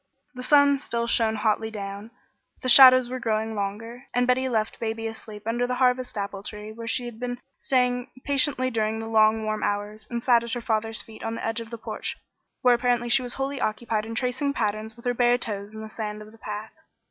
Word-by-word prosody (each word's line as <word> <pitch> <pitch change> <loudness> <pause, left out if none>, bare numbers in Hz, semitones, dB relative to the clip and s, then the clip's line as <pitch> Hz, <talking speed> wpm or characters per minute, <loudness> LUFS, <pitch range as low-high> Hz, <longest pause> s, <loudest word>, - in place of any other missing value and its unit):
The 250 - -7
sun 285 +1 +5
still 235 -3 -2
shone 225 -1 +2
hotly 220 +1 0
down, 200 0 -6 0.5
but - - -23
the 255 - +1
shadows 255 -1 +9
were 255 +1 -4
growing 220 -1 -1
longer, 225 +5 -5
and 245 0 +3
Betty 255 +1 +2
left 220 -2 -1
baby 225 0 -3
asleep 220 -2 -8
under 240 +2 0
the 250 - -1
Harvest 250 -2 +1
apple 200 -1 -4
tree 210 +1 -8
where 230 +1 -8
she 245 +2 -1
had 235 -2 -8
been 245 0 -3 0.2
staying 250 -1 +1
patiently 270 -2 +2
during 220 -1 0
the 225 - -5
long, 220 0 +3
warm 215 0 -2
hours, 205 +1 -3
and 235 -1 -3
sat 240 -2 +4
at 235 - -5
her 245 - -1
father's 225 0 -1
feet 220 -1 -13
on 225 0 -3
the - - -5
edge 225 0 -1
of 230 -1 -8
the 235 - -6
porch, - - -4 0.5
where 250 -1 +6
apparently 240 0 +1
she 270 +2 +4
was 245 -1 -4
wholly 270 +1 -3
occupied 215 0 -1
in 225 - -5
tracing 260 +4 -1
patterns 215 -2 -2
with 235 - -16
her 245 - +2
bare 245 0 +3
toes 210 -3 -5
in 220 - -7
the 220 - -6
sand 215 -1 -5
of 210 - -14
the 225 - -18
path. 210 +1 -6
230 Hz, 225 wpm, -25 LUFS, 215-250 Hz, 0.5 s, shadows